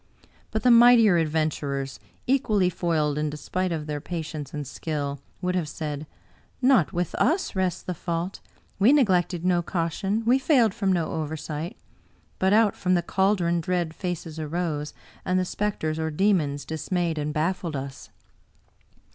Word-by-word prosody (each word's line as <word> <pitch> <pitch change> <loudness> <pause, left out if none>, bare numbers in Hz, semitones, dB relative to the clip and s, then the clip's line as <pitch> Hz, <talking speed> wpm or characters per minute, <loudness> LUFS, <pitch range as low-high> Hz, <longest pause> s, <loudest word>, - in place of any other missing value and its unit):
But 220 - -2
the 250 - +6
mightier 235 -4 +7
adven 155 0 +1
turers, 140 -2 -4 0.3
equally 215 -8 +2
foiled 155 -4 0
in 150 0 0
despite 180 +5 -3
of 155 -2 -3
their 150 -1 -4
patience 155 -4 -5
and 150 -1 -5
skill, 145 -1 -4 0.2
would 180 0 0
have 175 -5 -1
said, 150 -1 -5 0.3
* - - -35
Not 255 - +4
with 175 0 -2
us 335 - +1
rests 185 -2 -1
the 180 - -3
fault; 170 +2 -3 0.4
we 220 +8 +6
neglected 180 - +2
no 180 -1 +3
caution, 190 +6 -2
we 250 +3 +4
failed 250 - +3
from 200 -3 0
no 170 -3 0
oversight. 155 +1 -4 0.6
But 190 0 +3
out 215 0 +4
from 185 -1 +1
the 175 - +1
caldron 180 -2 +1
dread 175 -1 -1
faces 165 -3 -5
arose, 155 -1 -3 0.3
and 185 - +1
the 185 - 0
specters 180 -5 -2
or 160 0 -1
demons 155 -5 +1
dis 160 +3 -6
mayed 170 -3 0
and 150 0 -2
baffled 165 +1 -1
us.' 135 0 -6
170 Hz, 160 wpm, -25 LUFS, 155-190 Hz, 0.6 s, mightier